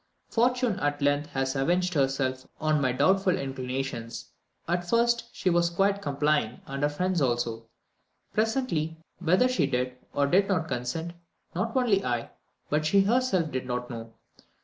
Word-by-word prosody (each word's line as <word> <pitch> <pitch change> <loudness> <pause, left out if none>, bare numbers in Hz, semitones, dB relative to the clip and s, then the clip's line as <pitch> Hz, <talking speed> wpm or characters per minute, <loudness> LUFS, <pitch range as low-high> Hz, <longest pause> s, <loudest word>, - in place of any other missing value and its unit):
"Fortune 245 -2 +2
at 145 0 0
length 145 +1 +1
has 135 0 -1
avenged 180 +6 +1
herself 135 -2 0
on 155 -1 +2
my 130 -2 +2
doubtful 185 +7 +3
inclinations. 130 -3 -4 0.4
At 175 +1 -1
first 235 0 +3
she 185 - 0
was 170 0 +3
quite 195 +3 +1
complying, 145 - 0
and 135 0 -5
her 145 - +3
friends 180 +3 0
also; 120 -3 -1 0.7
presently, 215 - 0 0.2
whether 180 +8 +4
she 255 - +1
did 125 -1 -1 0.2
or 140 - +2
did 190 +7 +3
not 170 -5 0
consent, 135 +6 -3 0.4
not 225 +7 -2
only 215 -6 +3
I, 120 -1 -2 0.4
but 150 +1 +1
she 195 +6 +4
herself 195 -7 +2
did 130 -1 -3
not 125 0 -3
know. 115 -1 -7
155 Hz, 150 wpm, -27 LUFS, 130-190 Hz, 0.7 s, whether